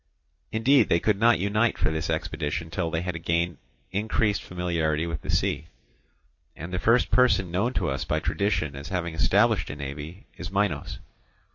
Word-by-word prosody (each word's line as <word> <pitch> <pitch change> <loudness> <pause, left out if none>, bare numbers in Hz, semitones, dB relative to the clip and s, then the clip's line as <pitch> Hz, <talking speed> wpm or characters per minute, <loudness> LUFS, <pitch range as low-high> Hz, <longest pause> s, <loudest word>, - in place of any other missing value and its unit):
Indeed, 125 +5 +4
they 85 - +4
could 105 +2 +1
not 115 +1 +5
unite 105 +4 +1
for - - +1
this 80 +1 -2
expedition 80 0 -2
till 85 0 -1
they 80 +1 -2
had 85 -3 -4
gained 85 -2 0 0.3
increased 105 +1 0
familiarity 85 -3 -1
with 80 -2 -4
the - - -10
sea. 80 - 0 0.9
And 85 +4 -8
the 90 - 0
first 115 +5 +3
person 120 -8 +3
known 105 +8 0
to - - 0
us 70 0 -1
by - - 0
tradition 80 -8 -1
as 70 +2 -7
having 85 -3 -2
established 100 +3 +2
a 70 - -5
navy 75 +6 -7
is 90 - -6
Minos. 100 -7 -1
90 Hz, 170 wpm, -26 LUFS, 80-105 Hz, 0.9 s, not